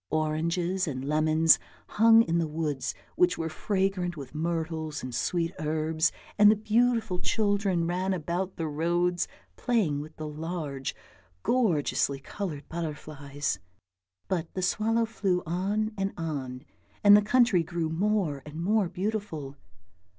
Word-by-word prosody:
Oranges 170 +4 0
and 130 -3 -4
lemons 155 +2 +4 0.3
hung 225 +1 +6
in 170 -4 0
the 165 - 0
woods 150 -3 -2 0.2
which 360 0 +3
were 165 0 -2
fragrant 190 -1 -1
with 135 -3 -8
myrtles 160 -1 -3
and 130 -1 -5
sweet 165 +7 0
herbs, 155 +1 +1 0.3
and 210 +1 +6
beautiful 225 -3 +2
children 200 -4 +1
ran 180 +3 -1
about 180 +2 -2
the 165 - -3
roads 175 +3 0 0.3
playing 205 - +1
with 155 +1 -10
the 155 - -5
large 150 -3 -4 0.5
gorgeously 165 - +1
coloured 150 -1 -6
butterflies. 150 - -4 0.7
But 170 -4 -2
the 185 - -2
swallow 225 +5 +2
flew 195 -5 -1
on 200 +6 -1
and 195 0 -1
on, 135 -6 -4 0.4
and 205 0 +9
the 210 - +6
country 225 -3 +4
grew 165 0 -2
more 180 -5 0
and 150 +3 -8
more 200 +1 +2
beautiful. 185 -7 -3
170 Hz, 130 wpm, -28 LUFS, 155-200 Hz, 0.7 s, and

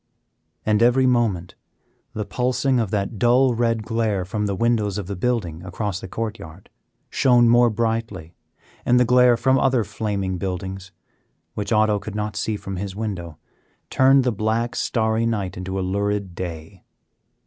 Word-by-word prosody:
And 110 0 +2
every 125 +2 +4
moment 110 -8 +1 0.6
the 105 -1 -3
pulsing 125 +2 0
of 110 -4 -1
that 100 +1 -2
dull 125 +2 +4
red 115 -1 0
glare 110 -4 -1
from 105 +2 -2
the 100 - -2
windows 105 -2 0
of 100 - -4
the 100 +2 -5
building 90 -6 -2
across 95 +1 -4
the - - -8
court 110 +3 -4
yard 80 +4 -12 0.4
shone 125 -3 +4
more 120 +1 +5
brightly, 110 -6 -3 0.5
and 125 +1 +3
the 125 - +4
glare 125 0 +5
from 130 +2 +2
other 130 -3 +2
flaming 100 -4 -3
buildings, 95 0 -5 0.6
which 105 - -4
Otto 110 -1 +3
could 105 +1 -8
not 105 -1 -3
see 105 +1 -2
from 95 -2 -6
his 95 0 -5
window, 90 -7 -5 0.5
turned 135 +1 +5
the 125 - +1
black, 110 +3 -1
starry 110 0 0
night 100 -5 -2
into 95 +1 -4
a 95 - -2
lurid 100 0 -2
day. 85 -3 -7
105 Hz, 160 wpm, -22 LUFS, 95-120 Hz, 0.6 s, more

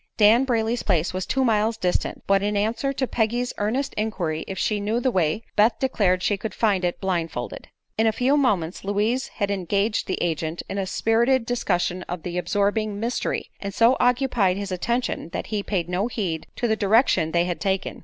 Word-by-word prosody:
Dan 225 +4 +6
Brayley's 230 -1 0
place 175 -4 0
was 185 0 -3
two 265 0 +1
miles 220 0 +2
distant, 180 -4 -1
but 195 0 +3
in 205 0 0
answer 225 +6 0
to 270 -1 -1
Peggy's 240 +1 -1
earnest 245 +7 -1
inquiry 180 -8 -2
if 190 - -5
she 210 -1 0
knew 215 +3 0
the 255 +1 +1
way 180 +1 0
Beth 220 +2 +4
declared 195 -9 +1
she 205 - +1
could 220 +2 -5
find 200 -5 +1
it 175 0 -1
blind 175 -4 -1
folded. - - -6 0.3
In 225 - +4
a - - +4
few 255 +5 +2
moments 200 - 0
Louise 210 +6 0
had 200 -2 -3
engaged 200 +3 0
the 185 - -1
agent 165 -1 -2
in 195 - -3
a 190 - -2
spirited 230 +5 +2
discussion 185 -7 -1
of 175 -3 -5
the 180 0 -3
absorbing 205 +2 0
"mystery" 235 +3 -2
and 200 -1 -5
so 230 +3 +5
occupied 245 -7 +2
his 200 -1 -4
attention 235 0 -2
that - - -3
he 210 - +1
paid 185 -4 -2
no 180 +5 0
heed 185 -9 -3
to 240 - -1
the 220 - +2
direction 200 -6 +3
they 170 +1 +2
had 175 -1 -3
taken. 195 -2 -1
205 Hz, 200 wpm, -24 LUFS, 185-230 Hz, 0.3 s, Dan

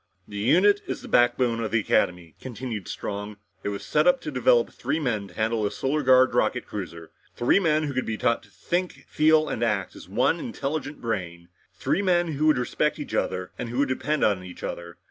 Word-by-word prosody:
"The 105 - -8
unit 185 - +4
is - - -4
the - - -8
backbone 120 -1 +3
of 110 -2 -2
the 115 - +2
Academy," 90 -4 0
continued 115 -5 -6
Strong. 105 +1 -5 0.3
"It - - -1
was 100 -1 -5
set - - +2
up - - +5
to - - -5
develop - - +3
three 160 - -2
men 110 -9 -1
to - - -16
handle 110 0 0
a 105 - +1
Solar 140 +7 -1
Guard 130 -2 +5
rocket 125 +1 +1
cruiser. 85 -5 -7 0.2
Three 120 +10 +3
men 155 -4 +2
who 145 -2 -3
could 130 - -2
be 110 -1 -2
taught 115 - +1
to - - -20
think, 180 +1 -3
feel 155 0 +3
and - - -3
act 105 -5 -1
as - - -12
one 125 - +2
intelligent 150 - -4
brain. 85 -7 -4 0.3
Three - - 0
men 175 -3 +2
who 155 0 0
would 155 -4 +5
respect 140 +4 0
each 150 - -7
other 90 0 -1
and 115 - -4
who 120 - -5
could 140 0 +2
depend 150 +3 -1
on 100 -3 +2
each 90 -1 -11
other. 85 0 -6
125 Hz, 215 wpm, -25 LUFS, 105-155 Hz, 0.3 s, up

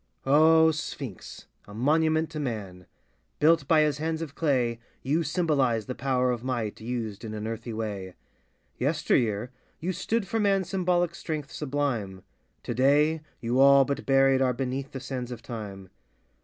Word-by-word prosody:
O 160 +3 +6
Sphinx 140 - -7
— - - -35
a - - -10
monument 155 +5 +2
to 155 - -5
man! 100 - -5 0.5
Built 155 -1 +3
by 160 -2 +5
his 150 -1 +1
hands 160 +1 -2
of 145 -3 -8
clay, 125 -8 0 0.2
You 150 +6 +1
symbolize 145 - +1
the 130 - -4
power 125 -1 0
of 120 -1 -3
might 120 -6 -3
Used 115 -3 -4
in 110 -1 -5
an 105 0 -5
earthy 115 +1 -5
way. 105 -4 -5 0.6
Yesteryear, 125 -5 +1 0.3
you 180 +3 -2
stood 210 +3 -1
for 225 +5 -1
man's 195 -3 +1
symbolic 175 -2 +1
strength 155 -4 -5
sublime, 130 -10 -2 0.4
Today, 145 +6 +2 0.2
you 120 +2 0
all 140 0 +7
but 140 - -4
buried 135 -1 +4
are 130 -1 +2
Beneath 135 +2 -3
the 135 - -6
sands 125 -1 -5
of 120 -2 -8
time. 100 -5 -7
135 Hz, 155 wpm, -27 LUFS, 115-155 Hz, 0.6 s, all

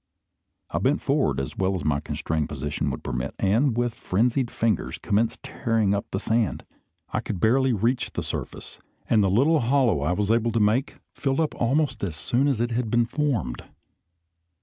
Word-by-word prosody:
I - - 0
bent - - +2
forward - - +1
as 70 - -4
well 95 0 0
as 90 - -4
my 75 -2 +2
constrained 80 0 -2
position 75 -1 -2
would 65 - -5
permit, 60 0 -3
and, 115 +6 +2
with 120 -1 0
frenzied 120 +7 0
fingers, 110 -7 -1
commenced 110 +3 0
tearing 115 -5 0
up 100 - -2
the 95 - -2
sand. 110 -2 0 0.5
I - - +1
could 95 - -4
barely 130 +6 +3
reach 120 +3 0
the - - -3
surface; - - -6 0.3
and 110 -3 +4
the 95 - +2
little 140 - +4
hollow 120 - +2
I 80 +5 +1
was 105 +3 0
able 115 0 +2
to 115 - +2
make 110 +6 +1 0.2
filled 135 0 -1
up 160 -2 +1
almost 140 +3 0
as 85 -6 -2
soon 125 - 0
as 135 -6 +1
it 120 +1 0
had 115 -1 -1
been 120 +1 +3
formed. 115 - -1
115 Hz, 185 wpm, -25 LUFS, 95-125 Hz, 0.5 s, and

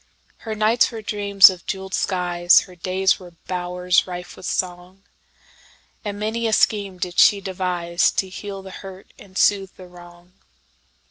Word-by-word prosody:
Her 220 -2 -6
nights 220 +3 +3
were 225 -2 -8
dreams 200 -2 +5
of 180 -2 -12
jeweled 190 0 -5
skies, 175 -1 +3
Her 185 - -13
days 185 +2 0
were 175 -2 -14
bowers 180 0 0
rife 180 0 -8
with 185 - -8
song, 180 +1 -4 1.0
And 205 -1 -5
many 225 +2 -2
a 220 - -1
scheme 200 -4 +1
did 180 0 -3
she 205 - +6
deviseTo 185 -1 -1
heal 195 0 -7
the 190 - -10
hurt 190 0 -11
and 190 -1 -12
soothe 195 -2 +2
the 185 - -12
wrong. 175 0 -16
185 Hz, 150 wpm, -21 LUFS, 180-200 Hz, 1.0 s, she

